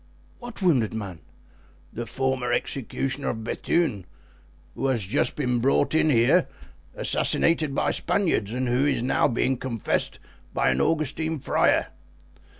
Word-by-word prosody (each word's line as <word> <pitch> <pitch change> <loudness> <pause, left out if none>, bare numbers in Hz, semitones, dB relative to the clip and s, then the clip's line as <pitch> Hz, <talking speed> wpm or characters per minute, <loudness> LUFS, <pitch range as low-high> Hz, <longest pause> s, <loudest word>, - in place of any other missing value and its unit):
"What 240 -5 -8
wounded 130 - +2
man?" 95 -6 -6 0.7
"The 120 0 -5
former 130 -2 -1
executioner 135 +2 -2
of 110 -1 -4
Bethune, 115 - -1 0.7
who 135 - -2
has 125 -5 +1
just 105 +5 0
been 125 -4 0
brought 135 +5 +2
in 160 0 +3
here, 120 -4 +4 0.5
assassinated 155 -4 +1
by - - +1
Spaniards, 165 - 0
and 125 +2 -2
who 125 +3 +2
is 135 -5 +1
now 130 - +2
being 130 0 0
confessed 115 -4 -2 0.4
by - - +2
an 65 +1 0
Augustine 160 - 0
friar." 135 - +1
130 Hz, 135 wpm, -25 LUFS, 115-150 Hz, 0.7 s, here